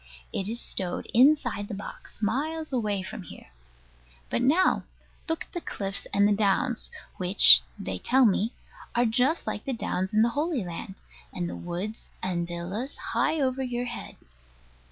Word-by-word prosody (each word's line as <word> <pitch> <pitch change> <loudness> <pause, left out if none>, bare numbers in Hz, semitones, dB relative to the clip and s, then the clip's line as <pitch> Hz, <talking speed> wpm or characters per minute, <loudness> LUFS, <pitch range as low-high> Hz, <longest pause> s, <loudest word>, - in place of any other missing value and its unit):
It 195 +1 -2
is 235 +2 -2
stowed 180 -6 -2
inside 245 -5 +3
the 205 - -5
box, 205 +2 -9
miles 305 +8 -2
away 210 -6 -1
from 185 - -7
here. 175 - -13 0.8
But - - 0
now, 310 +9 +3 0.4
look 325 - -1
at - - -24
the 350 - -5
cliffs 195 -8 -4
and 200 0 +4
the 210 - +3
downs, 215 +5 +1 0.3
which 180 - +9 0.2
(they 95 -1 -5
tell 260 - +3
me) 215 +2 +2 0.4
are 240 +1 +3
just 250 +8 +1
like 205 - -4
the 270 - -2
downs 190 -4 -2
in 215 0 +4
the 235 - +3
Holy 290 - -2
Land; 185 +3 -7 0.3
and 175 -1 -3
the - - -6
woods 180 +5 -6
and 175 -2 -1
villas, 180 +10 -5 0.2
high 315 0 +1
over 265 -1 0
your 245 -1 -3
head. 240 -1 -7
220 Hz, 165 wpm, -27 LUFS, 190-260 Hz, 0.8 s, which